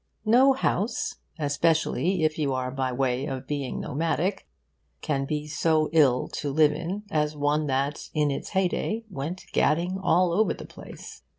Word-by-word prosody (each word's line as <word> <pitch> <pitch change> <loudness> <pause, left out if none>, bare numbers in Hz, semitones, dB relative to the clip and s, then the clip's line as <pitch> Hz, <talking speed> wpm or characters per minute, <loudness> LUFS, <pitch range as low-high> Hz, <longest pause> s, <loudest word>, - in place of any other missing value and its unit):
No 255 +5 +6
house, 260 +2 -1 0.2
especially 160 +4 +1
if 155 0 +1
you 140 -3 0
are 130 0 -2
by 130 -1 -2
way 130 +1 0
of 130 -3 -5
being 140 -3 -3
nomadic, 165 +6 -1 0.5
can 140 -3 -1
be 150 +1 -3
so 155 +1 +1
ill 140 -6 +4
to 145 - -4
live 150 +1 +4
in 175 +7 -4
as 150 -2 0
one 145 +1 +1
that 140 +2 -1
in 150 -2 +1
its 140 - -4
heyday 195 +4 0
went 170 +4 -5
gadding 175 +4 +1
all 180 -1 +3
over 215 +5 +2
the - - -9
place. - - -11
155 Hz, 160 wpm, -26 LUFS, 140-180 Hz, 0.5 s, No